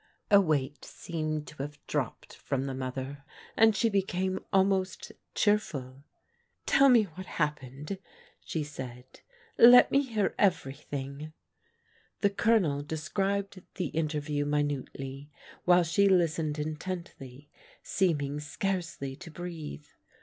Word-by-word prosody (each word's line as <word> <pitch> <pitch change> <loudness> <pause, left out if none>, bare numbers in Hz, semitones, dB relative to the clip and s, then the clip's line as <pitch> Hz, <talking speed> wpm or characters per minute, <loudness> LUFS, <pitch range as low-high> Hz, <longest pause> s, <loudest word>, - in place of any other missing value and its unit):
A 200 -1 +8
weight 145 -5 -1
seemed 155 -2 -4
to 150 - -14
have 145 +1 -6
dropped - - -3
from 135 0 -2
the 135 - -3
mother, 130 +2 -5 0.3
and 220 -1 +5
she 230 - +2
became 190 -2 0
almost 190 -1 +1 0.2
cheerful. 140 -11 0 0.3
" - - -44
Tell 275 0 +5
me 240 -4 +6
what 185 0 -9
hap 150 -3 -1
pened," 140 +8 -7 0.4
she 160 - -3
said. 130 -4 -8 0.4
" 465 0 -30 0.2
Let 250 - +8
me 275 - +4
hear 225 -7 -1
everything." 145 -4 -1 0.9
The 200 - +3
Colonel 195 -10 +2
described 195 +6 -2
the 185 - -2
interview 150 -2 -1
minutely, 145 -1 -3 0.4
while 180 0 +6
she 200 +5 +3
listened 165 -4 +2
intently, 150 -3 -6 0.3
seeming 150 -6 0
scarcely 170 -3 -3
to 170 - -10
breathe. 160 - -7
155 Hz, 120 wpm, -29 LUFS, 145-190 Hz, 0.9 s, A